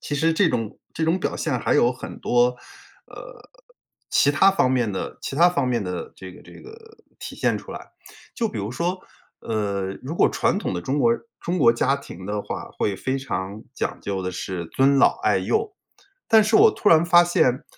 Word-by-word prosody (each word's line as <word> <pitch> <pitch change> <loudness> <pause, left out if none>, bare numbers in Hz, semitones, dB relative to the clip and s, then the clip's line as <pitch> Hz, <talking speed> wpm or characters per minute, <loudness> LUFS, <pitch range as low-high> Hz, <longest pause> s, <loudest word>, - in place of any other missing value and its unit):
其 145 - -4
实 160 +3 +1
这 180 -2 +3
种 115 -2 -3
这 165 - -4
种 165 +3 +2
表 - - -2
现 140 -6 -2
还 - - 0
有 120 - +4
很 130 - -8
多， 125 0 +2 0.5
呃， - - -13 0.6
其 145 - +4
他 155 +7 +4
方 190 -9 +1
面 120 -4 +1
的 95 - -5
其 - - -5
他 170 +4 +5
方 145 -7 -1
面 120 -3 0
的 90 -2 -5
这 95 0 -10
个 - - -15
这 - - -16
个 450 0 -15 0.2
体 - - -8
现 - - 0
出 - - -9
来。 - - -10 0.4
就 230 - -1
比 205 - -6
如 100 +1 -4
说， 175 +8 -2 0.4
呃， 100 -3 -3
如 140 +5 -5
果 - - +4
传 - - 0
统 - - -3
的 90 - -3
中 135 +8 -1
国 235 - +3
人 235 - -1 0.2
中 175 +2 -2
国 120 -6 +5
家 135 +4 +1
庭 95 -9 -11
的 105 0 -3
话， - - -7
会 100 - 0
非 130 +7 -3
常 105 -5 -5
讲 - - -3
究 100 -1 -3
的 90 - -3
是 90 -1 -5
尊 135 +9 +2
老 - - +4
爱 - - +2
幼。 435 -1 -1 0.5
但 220 -1 +6
是 215 +2 +3
我 440 +1 +7
突 210 - 0
然 165 0 +6
发 175 0 +6
现， 130 -7 +1
135 Hz, 230 characters per minute, -23 LUFS, 105-175 Hz, 0.6 s, 我